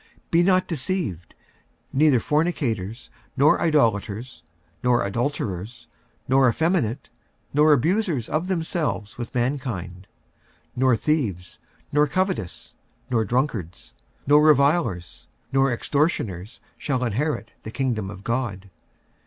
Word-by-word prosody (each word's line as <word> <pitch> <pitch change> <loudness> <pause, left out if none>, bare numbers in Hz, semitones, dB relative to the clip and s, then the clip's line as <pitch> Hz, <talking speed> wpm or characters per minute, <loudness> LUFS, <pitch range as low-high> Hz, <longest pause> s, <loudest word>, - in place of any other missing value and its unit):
Be 165 - +5
not 185 +1 +3
deceived: 150 - -3 0.6
neither 140 -2 +4
fornicators, 125 - -1 0.3
nor 145 +3 +4
idolaters, 115 - 0 0.4
nor 125 -3 +3
adulterers, 115 -1 -3 0.4
nor 130 0 +4
effeminate, 135 - 0 0.4
nor 150 +2 +5
abusers 160 - +1
of 160 +4 -1
themselves 160 - -2
with 120 +2 -6
mankind, 120 -9 -3 0.6
46:006:010 - - -9
Nor 130 -3 +4
thieves, 110 - -2 0.3
nor 150 +1 +3
covetous, 185 - -2 0.4
nor 115 -2 +2
drunkards, 110 - -2 0.3
nor 150 +2 +5
revilers, 140 - +2 0.3
nor 135 -1 +3
extortioners, 115 - -1 0.2
shall 130 -3 -1
inherit 125 +2 -2
the - - -8
kingdom 115 -5 -2
of 100 -1 -10
God. 110 -6 -3
130 Hz, 105 wpm, -24 LUFS, 110-150 Hz, 0.6 s, Be